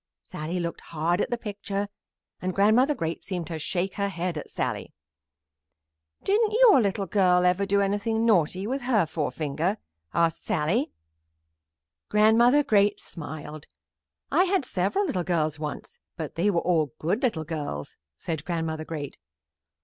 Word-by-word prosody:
Sallie 160 +4 -4
looked 170 -1 -4
hard 170 +4 -1
at - - -1
the 240 - -1
picture, 205 -2 -4 0.5
and 185 0 -2
Grandmother 230 +9 +4
Great 165 -5 -3
seemed 180 -3 -4
to 160 0 -5
shake 185 +4 -1
her 200 0 0
head 175 -2 -3
at 150 - -6
Sallie. - - -3 1.3
"Didn't 425 +2 +2
your 445 - +7
little 200 -1 0
girl 180 -2 +3
ever 180 +2 +2
do 200 +1 +3
anything 205 +3 0
naughty 185 -3 +2
with 265 +5 -2
her 240 -7 +2
forefinger?" 160 +4 -2 0.3
asked 165 -1 +1
Sallie. 195 - 0 1.2
Grandmother 230 +7 +5
Great 205 -6 +3
smiled. 155 -2 -8 0.6
"I 355 +6 +4
had 380 -6 +1
several 200 - 0
little 185 - -1
girls 160 -3 0
once, 150 -1 -6 0.2
but 160 -4 -5
they 180 +5 +1
were 170 -4 +2
all 160 -7 +1
good 185 - -1
little 220 - 0
girls," 150 - -5 0.2
said 160 - -4
Grandmother 160 -2 -3
Great. 150 -4 -6
185 Hz, 145 wpm, -26 LUFS, 160-215 Hz, 1.3 s, your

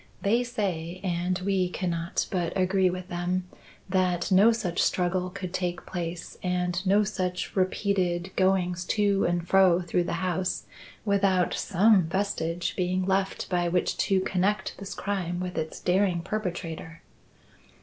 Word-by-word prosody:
They 230 +5 +3
say, 185 -8 -3
and 180 0 0
we 190 -2 +1
cannot 175 0 -2
but 175 -2 -1
agree 190 0 +3
with 180 0 -5
them, 180 +1 -2 0.4
that 185 -2 +1
no 200 +5 +7
such 180 -7 -1
struggle 180 0 +1
could 180 0 -6
take 175 -2 -2
place 170 -2 -5
and 180 0 -1
no 205 +2 +5
such 185 -3 -3
repeated 185 -2 0
goings 180 -2 +2
to 200 -2 +2
and 175 0 0
fro 185 -2 +5
through 175 0 0
the - - -2
house 185 0 -1 0.4
without 195 -3 +2
some 200 -1 +4
vestige 175 -2 -1
being 185 0 0
left 190 0 0
by 175 -1 +1
which 180 +1 +1
to 195 -2 +2
connect 195 +3 0
this 195 0 -6
crime 180 -4 -2
with 180 0 -4
its 160 0 -3
daring 180 -1 +2
perpetrator." 170 -5 -5
185 Hz, 140 wpm, -27 LUFS, 175-195 Hz, 0.4 s, no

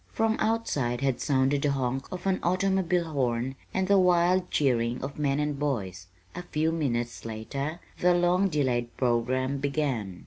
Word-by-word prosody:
From 225 0 +1
outside 145 - 0
had 135 -2 0
sounded 135 0 +2
the 145 -1 +1
honk 130 0 -2
of 185 - -6
an 190 -1 +1
automobile 180 -2 +1
horn 125 -2 0 0.2
and 190 0 0
the 200 0 +5
wild 180 0 +3
cheering 120 -4 +1
of 140 +2 -6
men 140 -1 +1
and 150 -1 -1
boys. 95 -11 -3 0.3
A 180 - -5
few 160 -2 -1
minutes 120 -7 -2
later 135 +8 -4 0.2
the 180 0 +4
long 180 +2 +3
delayed 125 -6 -1
programme 130 +2 0
began. 135 - -2
140 Hz, 160 wpm, -27 LUFS, 125-175 Hz, 0.3 s, the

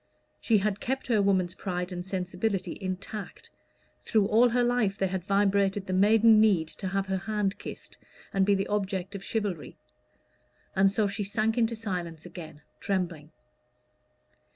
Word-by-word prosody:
She 225 - +3
had 205 0 0
kept 265 +1 -2
her 225 -4 +2
woman's 185 -3 +2
pride 180 -1 -4
and 180 -1 -4
sensibility 185 0 -2
intact: 190 +2 -6 0.5
through 215 -3 +2
all 230 +4 +4
her 245 +1 +2
life 240 -5 +1
there 195 - +1
had 185 -1 -3
vibrated 200 0 +2
the 185 - -3
maiden 215 +3 +6
need 190 -7 +3
to 190 - -6
have 195 +1 -1
her 190 0 -1
hand 205 0 -2
kissed - - -9 0.3
and 195 - +3
be 200 +1 +3
the 195 0 -1
object 195 -2 -2
of 195 -1 -6
chivalry. 200 -9 -3 1.0
And 195 0 +4
so 210 +1 +1
she 200 +1 -2
sank 215 +2 0
into 230 -1 +1
silence 180 -7 -5
again, 160 -4 -10 0.2
trembling. 175 -6 -2
195 Hz, 155 wpm, -28 LUFS, 185-215 Hz, 1.0 s, maiden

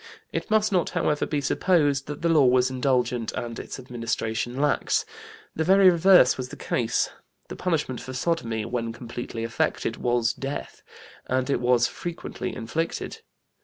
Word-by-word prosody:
It - - -3
must 215 0 +3
not, 180 -3 +2
however, 155 -4 0
be 145 -2 -1
supposed 145 -2 +2
that 150 +2 -6
the 170 - +3
law 155 -4 +5
was 125 +1 +3
indulgent 125 -3 0
and 115 -1 -5
its - - -7
administration 120 -1 -3
lax. 145 0 +1 0.5
The 160 - 0
very 190 +2 +6
reverse 175 -6 +6
was 130 0 -4
the 145 - -8
case. 120 -1 0 0.4
The - - -6
punishment 155 -9 -1
for 130 - -7
sodomy, 125 -7 -1
when 115 -1 -3
completely 120 -1 -6
effected, 115 0 -1
was 120 -1 +1
death, 135 +1 -6 0.5
and 130 +2 0
it 125 - +1
was 120 -1 +4
frequently 175 +5 -5
inflicted. 155 +9 -3
130 Hz, 155 wpm, -25 LUFS, 120-160 Hz, 0.5 s, very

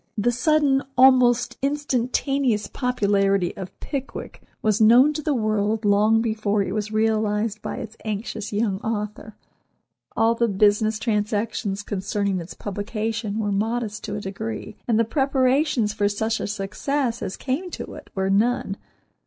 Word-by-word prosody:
The 225 +4 +2
sudden, 280 +1 +2 0.2
almost 255 -2 +5
instantaneous, 270 -4 0
popularity 200 -6 +1
of 190 -2 -6
"Pickwick" 275 -2 -6 0.2
was 215 0 +2
known 245 +7 +7
to 305 - -3
the 300 -1 0
world 215 -1 0
long 210 +2 +4
before 215 -2 0
it 195 - -4
was 215 0 -2
realized 215 -1 0
by - - -4
its 225 -3 -7
anxious 215 0 -4
young 205 -2 0
author. 210 -1 -4 0.8
All 225 +1 +4
the 235 0 +1
business 210 +1 +2
transactions 210 -2 -1
concerning 200 -1 -1
its 170 +1 -8
publication 215 +1 -3
were 210 -2 -1
modest 220 +1 -2
to 205 - -4
a 210 - -4
degree, 215 +2 -5
and 230 -3 +2
the 230 - +3
preparations 265 -2 +1
for 205 -1 +1
such 220 +2 -1
a - - -3
success 230 +5 -2
as 190 - -4
came 290 +8 -2
to - - -7
it - - -11
were 190 0 0
none. 205 -1 +1
220 Hz, 145 wpm, -23 LUFS, 205-245 Hz, 0.8 s, known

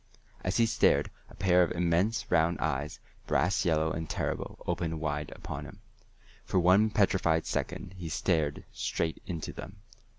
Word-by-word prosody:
As 95 - 0
he 115 - +5
stared, 110 -1 +3 0.2
a - - -14
pair 90 -2 +4
of 85 - +2
immense 90 +6 +1
round 85 0 +3
eyes, 70 +3 -2 0.3
brass - - +2
yellow 80 -1 +2
and 80 0 -4
terrible, - - -3
opened 80 -2 -2
wide 75 -1 -2
upon - - -6
him. - - -12 0.6
For 95 - +1
one 95 +5 +5
petrified 95 -6 +2
second 90 - -3
he 90 -3 -7
stared 80 -3 0
straight 80 -1 -2
into 85 -4 -4
them. - - -10
85 Hz, 155 wpm, -30 LUFS, 80-95 Hz, 0.6 s, he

